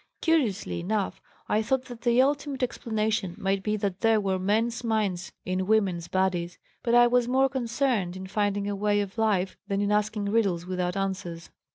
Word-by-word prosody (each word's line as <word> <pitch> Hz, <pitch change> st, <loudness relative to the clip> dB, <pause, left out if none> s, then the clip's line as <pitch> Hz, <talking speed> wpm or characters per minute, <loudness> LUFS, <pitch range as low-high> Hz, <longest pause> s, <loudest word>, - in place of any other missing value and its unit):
Curiously 265 Hz, -, +1 dB
enough, 200 Hz, +3 st, -2 dB, 0.3 s
I 215 Hz, -, +2 dB
thought 255 Hz, +4 st, 0 dB
that 240 Hz, -2 st, -10 dB
the 240 Hz, +1 st, +4 dB
ultimate 280 Hz, -1 st, -1 dB
explanation 215 Hz, -6 st, -1 dB
might 195 Hz, 0 st, 0 dB
be 210 Hz, +1 st, -1 dB
that 200 Hz, -2 st, -2 dB
there 225 Hz, -1 st, +4 dB
were 190 Hz, -2 st, 0 dB
men's 225 Hz, +5 st, 0 dB
minds 205 Hz, -5 st, -1 dB
in 185 Hz, 0 st, -1 dB
women's 190 Hz, -6 st, +1 dB
bodies, 180 Hz, -2 st, 0 dB, 0.2 s
but 235 Hz, 0 st, +1 dB
I 240 Hz, 0 st, +8 dB
was 245 Hz, 0 st, +3 dB
more 265 Hz, +2 st, +3 dB
concerned 235 Hz, -7 st, -1 dB
in 190 Hz, -, -7 dB
finding 205 Hz, 0 st, -1 dB
a 205 Hz, -, -1 dB
way 205 Hz, +1 st, +1 dB
of 200 Hz, +2 st, -5 dB
life 195 Hz, -4 st, +1 dB
than 200 Hz, -1 st, -1 dB
in 205 Hz, 0 st, +1 dB
asking 210 Hz, 0 st, 0 dB
riddles 200 Hz, -5 st, +1 dB
without 180 Hz, 0 st, -2 dB
answers. 185 Hz, -4 st, -4 dB
210 Hz, 180 wpm, -27 LUFS, 190-230 Hz, 0.3 s, I